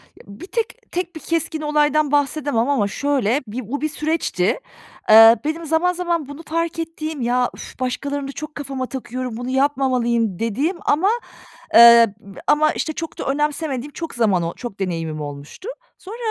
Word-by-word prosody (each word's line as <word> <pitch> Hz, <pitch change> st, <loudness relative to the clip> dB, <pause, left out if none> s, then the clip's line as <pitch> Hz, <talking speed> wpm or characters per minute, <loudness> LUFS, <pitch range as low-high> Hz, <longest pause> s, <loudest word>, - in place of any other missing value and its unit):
Ya -, -, -17 dB
bir 200 Hz, -, -10 dB
tek 460 Hz, +3 st, -4 dB
tek 355 Hz, 0 st, -3 dB
bir -, -, -6 dB
keskin 325 Hz, -1 st, -2 dB
olaydan 300 Hz, -1 st, +2 dB
bahsedemem 285 Hz, -4 st, +1 dB
ama 235 Hz, -8 st, +2 dB
şöyle, 270 Hz, +2 st, 0 dB
bi 235 Hz, +4 st, -5 dB
o 285 Hz, +3 st, -3 dB
bir 310 Hz, -, 0 dB
süreçti. 305 Hz, -, -1 dB, 0.5 s
Eee, 225 Hz, +1 st, +9 dB
benim 325 Hz, +2 st, -2 dB
zaman 325 Hz, +3 st, +2 dB
zaman 345 Hz, -4 st, -2 dB
bunu 285 Hz, +3 st, -9 dB
fark 330 Hz, +1 st, -2 dB
ettiğim, 315 Hz, -3 st, -5 dB
"Ya 245 Hz, +1 st, +1 dB
üf, -, -, -11 dB
başkalarını 280 Hz, +2 st, -3 dB
da -, -, -5 dB
çok 305 Hz, +2 st, -8 dB
kafama 270 Hz, -3 st, -4 dB
takıyorum, 255 Hz, -2 st, -5 dB
bunu 245 Hz, +1 st, -5 dB
yapmamalıyım" 255 Hz, -7 st, +1 dB
dediğim 275 Hz, -, -1 dB
ama, 350 Hz, +8 st, +3 dB, 0.7 s
eee, 235 Hz, -2 st, +8 dB
b 200 Hz, -2 st, -13 dB
ama 305 Hz, +1 st, +4 dB
işte 315 Hz, -, -3 dB
çok 330 Hz, +1 st, -6 dB
da -, -, -3 dB
önemsemediğim 290 Hz, -1 st, -2 dB
çok 330 Hz, -1 st, -6 dB
zaman 205 Hz, -7 st, +2 dB
o 165 Hz, -, -3 dB
çok 235 Hz, -5 st, -8 dB
deneyimim 165 Hz, -4 st, -3 dB
olmuştu. 145 Hz, -, -8 dB, 0.3 s
Sonra, 415 Hz, +5 st, -9 dB
280 Hz, 170 wpm, -21 LUFS, 235-315 Hz, 0.7 s, Eee